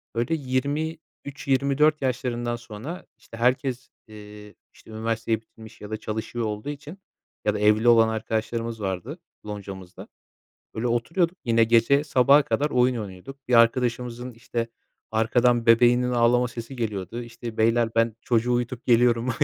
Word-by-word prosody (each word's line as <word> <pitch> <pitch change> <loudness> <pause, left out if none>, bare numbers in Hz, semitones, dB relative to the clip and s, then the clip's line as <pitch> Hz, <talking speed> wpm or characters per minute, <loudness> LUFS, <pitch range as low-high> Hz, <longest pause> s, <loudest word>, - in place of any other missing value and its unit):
böyle 120 +7 0
23-24 140 0 -1
yaşlarından 120 -2 -2
sonra 120 +8 -8
işte 115 - -13
herkes, 125 +2 0 0.2
ııı, 105 -1 -12 0.2
işte - - -17
üniversiteyi 110 0 -2
bitirmiş 110 0 -16
ya 105 - -8
da 110 - -3
çalışıyor 110 +2 -4
olduğu 105 +5 -4
için 145 +4 -8 0.5
ya 105 - +2
da 105 - -3
evli 105 +2 +3
olan 115 -1 +6
arkadaşlarımız 110 +1 -3
vardı 100 - -4 0.3
loncamızda. 100 -3 -8 0.7
Böyle 115 +3 -1
oturuyorduk 165 +10 0
yine 115 -1 +4
gece 115 +5 +3
sabaha 140 +1 +5
kadar 150 +1 0
oyun 125 -1 +2
oynuyorduk. 110 +6 -8
Bir 125 - -1
arkadaşımızın 120 +1 +2
işte 115 0 -4 0.4
arkadan 120 +2 +2
bebeğinin 120 +2 +4
ağlama 120 +1 +3
sesi 115 +2 -8
geliyordu: 110 -1 -4 0.2
"Beyler, 115 0 +1
ben 115 -1 +2
çocuğu 120 0 +1
uyutup 120 0 -2
geliyorum, 120 0 +3
120 Hz, 135 wpm, -25 LUFS, 110-125 Hz, 0.7 s, olan